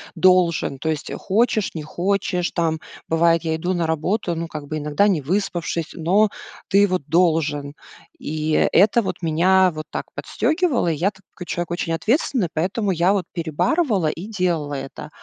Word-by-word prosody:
должен, 170 -5 +3
то 160 - -2
есть, 155 -2 -3
хочешь 215 +1 +1
не 155 - -4
хочешь, 180 +1 -1
там, 160 -2 0 0.3
бывает, 165 +1 +3
я 160 -1 0
иду 175 +3 -2
на 170 -2 0
работу, 170 +3 -1
ну, 165 +1 -3
как 150 -3 -7
бы, 155 - -3
иногда 150 +7 +1
не 180 -8 +1
выспавшись, 170 -1 -2
но 195 +6 +2 0.4
ты 200 +1 +4
вот 185 -5 -1
должен. 155 -3 +1 0.4
И 155 +1 -3 0.2
это 215 +4 +5
вот 190 - -4
меня 180 +3 +3
вот 155 0 -6
так - - -4
подстёгивало. 315 - 0
И - - -1
я 180 +7 +1
такой 190 -2 -13
человек 175 0 -3
очень 170 -1 -2
ответственный, 230 - +1
поэтому 190 +5 0
я 175 +3 +2
вот 195 -4 -1
перебарывала 185 - 0
и 165 +5 -4
делала 175 -8 -1
это. 135 +2 -7
175 Hz, 165 wpm, -22 LUFS, 160-195 Hz, 0.4 s, это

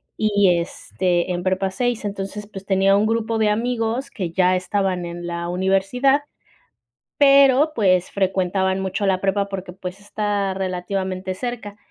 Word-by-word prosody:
y, 205 -4 +3
este, 175 +1 -2
en 175 - -2
Prepa 190 +1 0
6, 240 +1 -1
entonces, 200 +1 -5
pues, 195 -2 -10
tenía 195 0 +3
un 210 +2 +2
grupo 225 0 -1
de 215 -1 +3
amigos 230 +3 -1
que 190 -9 -4
ya 185 +1 +3
estaban 185 -1 -1
en 175 0 -7
la 170 0 -4
universidad, 195 +10 +2 1.0
pero 280 +1 +5
pues 185 -4 +2
frecuentaban 190 0 0
mucho 190 +2 -2
la 185 -1 +1
prepa 200 0 0
porque 190 -2 -6
pues 185 +1 -7
está 205 -1 -2
relativamente 185 0 -3
cerca. 225 -2 -6
195 Hz, 145 wpm, -21 LUFS, 185-215 Hz, 1.0 s, pero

